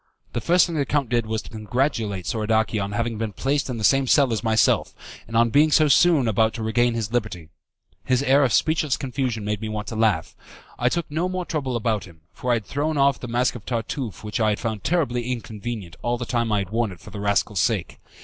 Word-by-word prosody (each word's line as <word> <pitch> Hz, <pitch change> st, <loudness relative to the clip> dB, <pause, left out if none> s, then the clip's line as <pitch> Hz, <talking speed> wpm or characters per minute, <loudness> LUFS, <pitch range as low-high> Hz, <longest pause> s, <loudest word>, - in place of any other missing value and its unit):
The 120 Hz, -, -2 dB
first 175 Hz, +6 st, +4 dB
thing 170 Hz, -, -5 dB
the 145 Hz, -, +1 dB
count 140 Hz, -2 st, -1 dB
did 120 Hz, -2 st, 0 dB
was 110 Hz, 0 st, -2 dB
to -, -, -13 dB
congratulate 110 Hz, -, -2 dB
Soradaci 110 Hz, 0 st, 0 dB
on 100 Hz, +1 st, -5 dB
having 115 Hz, 0 st, -2 dB
been 110 Hz, -2 st, -3 dB
placed 140 Hz, +4 st, -1 dB
in 125 Hz, -, -3 dB
the 110 Hz, -, -5 dB
same 135 Hz, +3 st, +4 dB
cell 135 Hz, -2 st, +4 dB
as 110 Hz, -, -2 dB
myself, 110 Hz, -2 st, +2 dB, 0.3 s
and 115 Hz, -, -2 dB
on 115 Hz, 0 st, +4 dB
being 150 Hz, +4 st, +5 dB
so 155 Hz, 0 st, +4 dB
soon 150 Hz, -3 st, +4 dB
about 110 Hz, +1 st, +2 dB
to 115 Hz, -, -4 dB
regain 120 Hz, +2 st, +1 dB
his 110 Hz, -1 st, -3 dB
liberty. 105 Hz, -9 st, -2 dB, 0.5 s
His 130 Hz, +1 st, +1 dB
air 140 Hz, +1 st, +4 dB
of 130 Hz, -, +2 dB
speechless 155 Hz, -1 st, +2 dB
confusion 125 Hz, -5 st, -3 dB
made 105 Hz, 0 st, -2 dB
me 110 Hz, -, -4 dB
want 105 Hz, -1 st, -4 dB
to 115 Hz, -, -6 dB
laugh. 110 Hz, -7 st, +1 dB, 0.4 s
I 125 Hz, -, +3 dB
took 170 Hz, +4 st, -1 dB
no 170 Hz, +4 st, -1 dB
more 185 Hz, -1 st, -3 dB
trouble 135 Hz, -7 st, -2 dB
about 110 Hz, -3 st, -1 dB
him, 85 Hz, -4 st, -17 dB
for 125 Hz, -, -5 dB
I 120 Hz, -, +4 dB
had 110 Hz, -3 st, -3 dB
thrown 150 Hz, +2 st, -2 dB
off 140 Hz, 0 st, +3 dB
the 125 Hz, -, -6 dB
mask 120 Hz, +2 st, +1 dB
of 120 Hz, -, -9 dB
Tartuffe 115 Hz, 0 st, -4 dB
which 105 Hz, +3 st, -3 dB
I 110 Hz, -1 st, +3 dB
had 105 Hz, -, -1 dB
found 110 Hz, -3 st, -3 dB
terribly 125 Hz, -8 st, 0 dB
inconvenient 110 Hz, -6 st, -6 dB
all 120 Hz, 0 st, -1 dB
the 120 Hz, -, -4 dB
time 115 Hz, -2 st, -1 dB
I 105 Hz, -, +2 dB
had 100 Hz, -1 st, -3 dB
worn 115 Hz, -2 st, 0 dB
it 90 Hz, -, -11 dB
for -, -, -13 dB
the 105 Hz, -, -7 dB
rascal's 100 Hz, -1 st, 0 dB
sake. 110 Hz, -4 st, 0 dB
115 Hz, 240 wpm, -23 LUFS, 110-135 Hz, 0.5 s, being